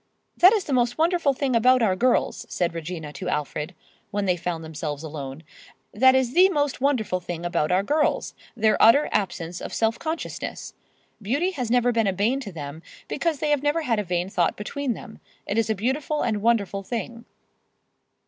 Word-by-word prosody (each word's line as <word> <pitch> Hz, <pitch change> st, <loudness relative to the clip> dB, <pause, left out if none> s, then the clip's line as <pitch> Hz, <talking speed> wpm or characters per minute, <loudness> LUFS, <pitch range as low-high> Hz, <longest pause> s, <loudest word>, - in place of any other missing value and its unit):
"That 365 Hz, +2 st, +7 dB
is 425 Hz, -3 st, +1 dB
the 290 Hz, -, -3 dB
most 245 Hz, -1 st, +1 dB
wonderful 335 Hz, -2 st, +2 dB
thing 265 Hz, -2 st, -1 dB
about 250 Hz, +2 st, +4 dB
our 190 Hz, -4 st, +2 dB
girls," 250 Hz, +6 st, +1 dB
said 175 Hz, -2 st, -1 dB
Regina 160 Hz, -2 st, -6 dB
to 185 Hz, -, -5 dB
Alfred, 150 Hz, +3 st, -3 dB, 0.3 s
when 205 Hz, -1 st, -2 dB
they 180 Hz, -2 st, +2 dB
found 170 Hz, -1 st, -4 dB
themselves 150 Hz, -1 st, -5 dB
alone, 145 Hz, -1 st, -7 dB, 0.5 s
"that 260 Hz, +5 st, +5 dB
is 260 Hz, -2 st, +1 dB
the 370 Hz, +4 st, +6 dB
most 290 Hz, -7 st, -1 dB
wonderful 245 Hz, -9 st, +1 dB
thing 175 Hz, -1 st, -6 dB
about 170 Hz, -2 st, 0 dB
our 185 Hz, +2 st, +3 dB
girls—their 230 Hz, -5 st, 0 dB
utter 280 Hz, +7 st, +6 dB
absence 175 Hz, -4 st, -2 dB
of -, -, -6 dB
self 225 Hz, +1 st, +1 dB
consciousness. 320 Hz, +1 st, -5 dB, 0.5 s
Beauty 285 Hz, -, 0 dB
has 255 Hz, -10 st, -4 dB
never 245 Hz, 0 st, +3 dB
been 225 Hz, -3 st, +1 dB
a 195 Hz, -, +1 dB
bane 220 Hz, +8 st, +1 dB
to 225 Hz, -7 st, -7 dB
them, 150 Hz, -1 st, -7 dB, 0.3 s
because 335 Hz, -3 st, -1 dB
they 300 Hz, +2 st, -1 dB
[Pg 295 Hz, -, +4 dB
113]have -, -, -15 dB
never 295 Hz, +3 st, +1 dB
had 230 Hz, -6 st, +1 dB
a -, -, -1 dB
vain 175 Hz, -1 st, -1 dB
thought 175 Hz, -4 st, 0 dB
between 255 Hz, +4 st, -3 dB
them. 220 Hz, -, -11 dB, 0.3 s
It 205 Hz, -, 0 dB
is 225 Hz, -1 st, 0 dB
a 220 Hz, -, +1 dB
beautiful 270 Hz, +8 st, -1 dB
and 215 Hz, -4 st, -1 dB
wonderful 205 Hz, -3 st, +1 dB
thing." 230 Hz, +2 st, -5 dB
225 Hz, 190 wpm, -24 LUFS, 180-270 Hz, 0.5 s, That